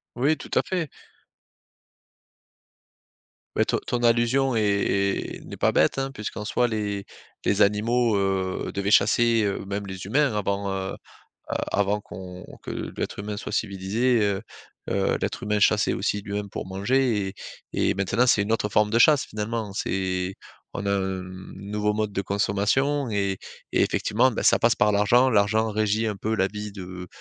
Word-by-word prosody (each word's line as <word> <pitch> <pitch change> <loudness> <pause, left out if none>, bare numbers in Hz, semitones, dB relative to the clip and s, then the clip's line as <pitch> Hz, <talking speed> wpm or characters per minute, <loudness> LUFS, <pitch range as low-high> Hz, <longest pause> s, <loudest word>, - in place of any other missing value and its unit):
Oui, 140 +6 +2
tout - - -11
à - - +5
fait. 180 -5 -2 2.7
Beh, - - +3
ton - - 0
ton 120 - -1
allusion 120 +3 +3
est 100 -2 0
est - - -16
n'est - - -8
pas - - +2
bête, - - +3
hein, 135 0 -1
puisqu'en 105 -2 -5
soi, 120 +2 +1
les 105 -3 -2 0.4
les 100 +1 +1
animaux, 110 +3 +3
heu, 95 -1 -1
devaient 100 0 -1
chasser. 115 0 +4
Heu, 100 -1 -2
même 100 +1 -4
les 95 -1 -7
humains, 135 +5 +2
avant, 100 0 -1
heu 95 0 -3
heu, - - -6 0.8
avant 100 +1 +1
qu'on 90 -2 -9 0.2
que - - -5 0.2
l'être - - -3
humain 105 0 -4
soit - - -6
civilisé, 110 +5 +1
heu 100 -1 0 0.5
heu, - - +1
l'être - - -3
humain 105 0 0
chassait 105 0 +3
aussi 105 0 -1
lui-même 100 0 -4
pour - - -5
manger. 105 +2 +1
Et 95 - -8 0.6
et - - +1
maintenant, 100 +6 +1
c'est 110 -4 +4
une 100 - -4
autre 110 -2 +1
forme 105 0 +2
de 115 - +3
chasse, 145 +2 +5
finalement. 105 0 -4
C'est 95 -1 -1 0.4
on 100 - -4
a 100 - 0
un 95 -1 -1 0.3
nouveau 105 +2 -2
mode 105 -1 -1
de 100 - -1
consommation 105 +9 +1
et 100 -2 0 0.3
et - - +2
effectivement, 125 +4 +2
bah, - - -3
ça - - +5
passe 115 0 +3
par 105 - +3
l'argent. 115 +6 +4
L'argent 110 0 +2
régit 110 +1 +1
un 105 - -3
peu 110 +3 -2
la 95 -2 +1
vie 105 0 -6
de 90 -2 -8
105 Hz, 170 wpm, -25 LUFS, 100-115 Hz, 2.7 s, à